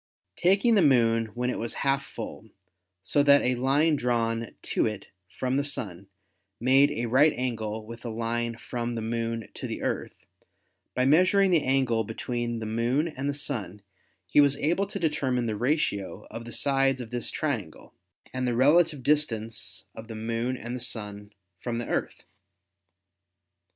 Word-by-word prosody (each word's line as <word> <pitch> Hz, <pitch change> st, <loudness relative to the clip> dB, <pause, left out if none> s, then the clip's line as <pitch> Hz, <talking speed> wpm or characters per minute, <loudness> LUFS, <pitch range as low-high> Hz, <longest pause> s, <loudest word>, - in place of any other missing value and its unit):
Tak 195 Hz, +5 st, +3 dB
ing 235 Hz, -, +6 dB
the 205 Hz, -, +5 dB
Moon 115 Hz, -6 st, +4 dB
when 125 Hz, +1 st, 0 dB
it -, -, -4 dB
was 115 Hz, -, -3 dB
half 135 Hz, 0 st, +2 dB
full, 110 Hz, -3 st, -8 dB, 0.5 s
so 145 Hz, -, +2 dB
that 140 Hz, 0 st, +6 dB
a 125 Hz, -, +2 dB
line 140 Hz, +6 st, +2 dB
drawn 115 Hz, -3 st, -1 dB
to -, -, +1 dB
it 105 Hz, -2 st, -6 dB, 0.2 s
from 130 Hz, +7 st, -1 dB
the 140 Hz, -, +1 dB
Sun 100 Hz, -10 st, -5 dB, 0.5 s
made 135 Hz, +4 st, +5 dB
a 120 Hz, -, -2 dB
right 135 Hz, +6 st, +5 dB
angle 110 Hz, -4 st, -3 dB
with 115 Hz, +1 st, -10 dB
a 120 Hz, -, -4 dB
line 115 Hz, +1 st, -2 dB
from 120 Hz, 0 st, -4 dB
the 115 Hz, -, -3 dB
Moon 115 Hz, 0 st, -2 dB
to -, -, -6 dB
the -, -, -5 dB
Earth, -, -, -3 dB, 0.7 s
by 125 Hz, -, +2 dB
measuring 185 Hz, +6 st, +5 dB
the 165 Hz, -4 st, +4 dB
angle 130 Hz, -4 st, +2 dB
between 120 Hz, +2 st, -3 dB
the 110 Hz, -, -4 dB
Moon 120 Hz, +8 st, 0 dB
and 140 Hz, -2 st, -3 dB
the 140 Hz, -, -1 dB
Sun 105 Hz, -9 st, -4 dB, 0.4 s
he 90 Hz, +11 st, +5 dB
was 140 Hz, -1 st, +3 dB
able 175 Hz, +7 st, +1 dB
to -, -, -5 dB
determine 135 Hz, -6 st, 0 dB
the 110 Hz, -2 st, -1 dB
ratio 120 Hz, -5 st, -1 dB
of 115 Hz, 0 st, -7 dB
the 120 Hz, -, -8 dB
sides 135 Hz, 0 st, +1 dB
of 120 Hz, -2 st, -7 dB
this 120 Hz, -1 st, -4 dB
triangle 115 Hz, -, -4 dB, 0.4 s
and 130 Hz, 0 st, -1 dB
the 120 Hz, -, 0 dB
relative 150 Hz, +2 st, +4 dB
distance 115 Hz, -7 st, -1 dB
of 110 Hz, -, -10 dB
the 115 Hz, -, -7 dB
Moon 115 Hz, +3 st, -2 dB
and 120 Hz, +1 st, -5 dB
the -, -, -4 dB
Sun 105 Hz, -4 st, -3 dB, 0.3 s
from 120 Hz, +1 st, -3 dB
the 120 Hz, -, -3 dB
Earth. -, -, -3 dB
120 Hz, 170 wpm, -27 LUFS, 115-140 Hz, 0.7 s, ing